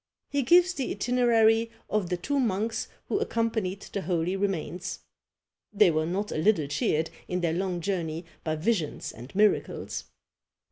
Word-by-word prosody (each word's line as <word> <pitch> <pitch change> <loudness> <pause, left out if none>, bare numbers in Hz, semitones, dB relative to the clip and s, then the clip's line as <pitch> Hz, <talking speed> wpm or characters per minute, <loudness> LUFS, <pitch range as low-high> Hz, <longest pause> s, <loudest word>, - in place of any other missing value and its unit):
He 285 - +2
gives 350 +7 +5
the 270 -6 -3
itinerary 230 -1 +3 0.2
of 205 -4 0
the 180 - 0
two 285 +10 -1
monks 225 -2 0 0.2
who 405 - 0
accompanied 220 - -1
the 200 - -1
holy 175 +1 0
remains. 185 -2 -2 0.7
They 210 -4 +5
were 155 0 0
not 200 +4 -2
a - - -2
little 180 -3 +3
cheered 150 +3 0 0.2
in 180 0 -1
their 165 -2 +1
long 180 0 -1
journey 170 -2 -2 0.2
by 155 -1 -1
visions 165 -1 -1
and 120 +3 -11
miracles. 210 +1 +1
195 Hz, 150 wpm, -28 LUFS, 170-225 Hz, 0.7 s, gives